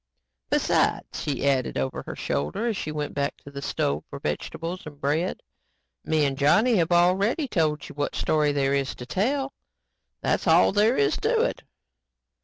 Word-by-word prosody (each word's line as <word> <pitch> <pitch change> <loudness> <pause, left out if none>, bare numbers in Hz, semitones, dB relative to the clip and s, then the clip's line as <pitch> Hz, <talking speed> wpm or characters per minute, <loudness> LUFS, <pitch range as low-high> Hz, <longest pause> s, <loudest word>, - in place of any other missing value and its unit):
"Besides," - - +1
she 140 -1 -1
added 130 -3 +1
over 65 0 -2
her - - -5
shoulder 75 - -2
as 230 -2 0
she 155 - -4
went 150 -1 -4
back 140 0 -2
to 140 - -11
the 140 0 -7
stove 75 - -1
for - - -7
vegetables 165 - -4
and 145 -2 -11
bread, 155 +6 -1 0.6
"me 155 -2 +2
'n 135 -1 0
Johnny 210 - +4
have 170 -1 +1
already 190 - +3
told 155 - 0
you - - -10
what 145 0 -2
story 150 -1 +2
there 140 -1 +1
is 140 -1 -1
to 125 - -8
tell. 265 - -1 0.7
That's - - 0
all - - +6
there 215 +4 +3
is 140 -1 +2
to - - +1
it." - - -2
150 Hz, 175 wpm, -25 LUFS, 140-185 Hz, 0.7 s, all